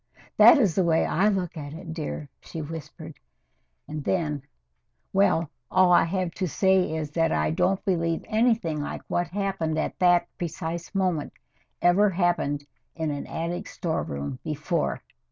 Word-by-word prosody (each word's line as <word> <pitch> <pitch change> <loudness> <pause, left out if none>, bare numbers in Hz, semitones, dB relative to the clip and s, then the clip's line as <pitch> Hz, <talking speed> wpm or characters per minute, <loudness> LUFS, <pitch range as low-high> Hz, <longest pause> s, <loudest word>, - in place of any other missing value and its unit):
"That - - +9
is 210 -11 +3
the 190 - +2
way 165 -1 +3
I 190 +6 +2
look 185 -5 0
at 145 -2 -7
it, 165 -1 -7
dear," 155 -2 -5
she 165 - -8
whispered, 160 0 -8 0.7
and 150 -1 -5
then 150 -5 -1 0.7
well, 180 -5 +2 0.2
all 185 -1 +4
I 175 - +6
have 185 0 -1
to 185 +2 -2
say 190 -1 +2
is 155 -2 -3
that 165 +1 +1
I 75 0 +1
don't 190 - +1
believe 165 -3 0
anything 215 -9 +1
like 145 - -5
what 175 0 0
happened 190 -4 -2
at 155 - -2
that 175 -1 +4
precise 170 +2 -4
moment 180 -6 0 0.5
ever 195 +4 +5
happened 170 -6 0 0.3
in 160 -2 -2
an 145 -1 -5
attic 170 +2 -4
storeroom 125 - -3
before. 155 +2 -2
170 Hz, 155 wpm, -26 LUFS, 155-185 Hz, 0.7 s, That